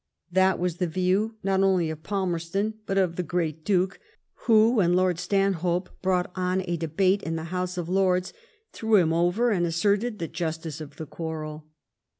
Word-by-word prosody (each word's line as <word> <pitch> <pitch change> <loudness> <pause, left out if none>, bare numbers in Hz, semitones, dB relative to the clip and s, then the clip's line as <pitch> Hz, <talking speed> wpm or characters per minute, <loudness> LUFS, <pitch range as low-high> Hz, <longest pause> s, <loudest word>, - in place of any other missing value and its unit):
That 190 +1 +3
was 175 -1 -2
the 180 - 0
view, 185 +6 0
not 195 0 +2
only 185 -4 +2
of 155 -1 -8
PalmerstoUj 190 +2 -2
but 195 - -1
of 180 -3 +1
the - - +1
great 165 -2 -2
Duke, 185 0 +1 0.5
who, 225 0 +6
when 175 -3 +3
Lord 180 -2 +2
Stanhope 180 -1 0
brought 180 -1 0
on 185 0 0
a 175 -1 -1
debate 185 +5 +1
in 165 - -3
the 160 - -4
House 180 0 -2
of 175 -2 -3
Lords, 185 0 +1 0.4
threw 220 -1 +1
him 165 -5 +4
over 175 +8 +2
and 180 -4 +1
asserted 200 +7 +1
the 165 - -3
justice 160 -1 -4
of 145 -2 -9
the 160 - -6
quarrel. 155 -1 -6
180 Hz, 175 wpm, -26 LUFS, 165-195 Hz, 0.5 s, who